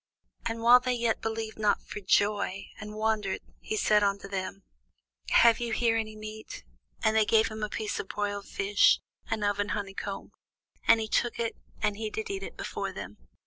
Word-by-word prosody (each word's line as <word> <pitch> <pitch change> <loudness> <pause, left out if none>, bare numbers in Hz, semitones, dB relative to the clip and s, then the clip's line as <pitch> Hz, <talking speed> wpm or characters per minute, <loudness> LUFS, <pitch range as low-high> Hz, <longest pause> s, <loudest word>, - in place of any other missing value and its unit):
And 230 0 -3
while 245 +2 +9
they 255 0 0
yet 235 -2 0
believed 220 -1 -3
not 210 -1 +2
for - - -7
joy, 200 -1 +1
and 210 0 -7
wondered, 215 -3 0 0.2
he 215 - -3
said 210 0 +4
unto 200 -1 0
them, 195 0 -4 0.7
Have 235 -1 +6
ye 240 -1 -2
here 230 0 +2
any 215 -1 -2
meat? 215 0 -8 0.4
And 220 0 +3
they 220 - +6
gave 220 +1 +4
him 215 0 -7
a 210 - -1
piece 215 0 -3
of - - -3
a - - -29
broiled 205 -1 -3
fish, 200 +1 +4 0.3
and 220 -2 -1
of 205 0 +1
an 205 0 0
honeycomb. 195 0 -5 0.6
And 230 - +7
he 220 - -2
took 240 +2 +1
it, 230 -1 -1 0.3
and 205 - +2 0.2
did 220 - -4
eat 390 0 -5
before - - -3
them. - - -8
215 Hz, 185 wpm, -29 LUFS, 205-225 Hz, 0.7 s, while